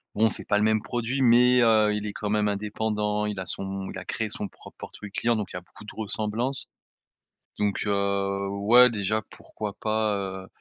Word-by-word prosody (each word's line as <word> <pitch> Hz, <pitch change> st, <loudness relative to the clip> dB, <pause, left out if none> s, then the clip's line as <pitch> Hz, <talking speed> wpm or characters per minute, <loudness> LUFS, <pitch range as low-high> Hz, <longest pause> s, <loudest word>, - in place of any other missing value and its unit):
Bon, 110 Hz, +2 st, +4 dB
c'est -, -, -2 dB
pas 105 Hz, -, +3 dB
le 105 Hz, -, +2 dB
même 110 Hz, 0 st, +2 dB
produit, 120 Hz, +4 st, -2 dB
mais, 125 Hz, 0 st, +6 dB
heu, 110 Hz, -2 st, +4 dB
il 105 Hz, 0 st, -3 dB
est 105 Hz, -, -5 dB
quand 105 Hz, -, -4 dB
même 105 Hz, 0 st, +1 dB
indépendant, 105 Hz, 0 st, -1 dB
il 105 Hz, -1 st, -3 dB
a -, -, -5 dB
son, 95 Hz, +1 st, -3 dB
il -, -, -7 dB
a 95 Hz, -, -10 dB
créé 110 Hz, -1 st, -2 dB
son 105 Hz, 0 st, -2 dB
propre -, -, -16 dB
portefeuille 105 Hz, -2 st, -9 dB
client 120 Hz, +4 st, +1 dB
donc 105 Hz, -3 st, -3 dB
il -, -, -5 dB
y -, -, -4 dB
a -, -, -18 dB
beaucoup 90 Hz, -, -15 dB
de -, -, -8 dB
ressemblances. 110 Hz, +4 st, -1 dB, 0.9 s
Donc, 105 Hz, -1 st, 0 dB
heu, 100 Hz, -1 st, 0 dB
ouais 110 Hz, +6 st, +6 dB
déjà 110 Hz, -1 st, -1 dB
pourquoi 105 Hz, -1 st, -7 dB
pas, 110 Hz, -1 st, 0 dB
heu, 95 Hz, -1 st, -5 dB
105 Hz, 210 wpm, -26 LUFS, 100-110 Hz, 0.9 s, mais